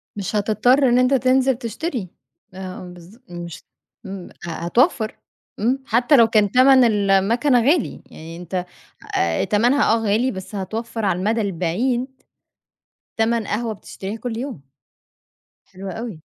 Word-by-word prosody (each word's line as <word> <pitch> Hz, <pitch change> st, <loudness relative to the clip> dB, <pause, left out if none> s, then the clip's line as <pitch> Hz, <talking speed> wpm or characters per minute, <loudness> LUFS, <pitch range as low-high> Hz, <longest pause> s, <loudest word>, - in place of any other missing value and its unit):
مش 200 Hz, +1 st, -4 dB
هتضطر 225 Hz, +6 st, +3 dB
إن 240 Hz, -, +3 dB
أنت 255 Hz, +2 st, +3 dB
تنزل 260 Hz, 0 st, +3 dB
تشتري، 235 Hz, -, -4 dB, 0.4 s
آه 185 Hz, 0 st, -7 dB
بالض 180 Hz, +4 st, -14 dB
مش 175 Hz, -1 st, -8 dB, 0.4 s
إمم 190 Hz, -2 st, -7 dB, 0.2 s
ه -, -, -5 dB
هتوفّر، 215 Hz, -, +1 dB, 0.4 s
إمم، 250 Hz, +6 st, +1 dB
حتّى 245 Hz, +5 st, +3 dB
لو 230 Hz, -4 st, +6 dB
كان 210 Hz, -3 st, +2 dB
تَمَن 260 Hz, +1 st, +6 dB
الماكنة 220 Hz, +4 st, +3 dB
غالي، 290 Hz, +5 st, +1 dB
يعني 165 Hz, +1 st, -10 dB
أنت 180 Hz, +1 st, -4 dB, 0.5 s
آآ 85 Hz, -1 st, +1 dB
تَمَنها 235 Hz, +4 st, +3 dB
آه -, -, +3 dB
غالي، 225 Hz, +5 st, +1 dB
بس 190 Hz, +1 st, -8 dB
هتوفّر 225 Hz, +3 st, -4 dB
على 180 Hz, -2 st, +1 dB
المدى 220 Hz, +4 st, 0 dB
البعيد 205 Hz, +7 st, -1 dB, 1.1 s
تَمَن 225 Hz, -1 st, +1 dB
قهوة 225 Hz, +2 st, -2 dB
بتشتريها 200 Hz, +1 st, -7 dB
كل 230 Hz, 0 st, -5 dB
يوم. 250 Hz, -, -6 dB, 1.0 s
حلو 195 Hz, +1 st, -9 dB
أوي. 220 Hz, -7 st, -7 dB
220 Hz, 135 wpm, -21 LUFS, 190-245 Hz, 1.1 s, لو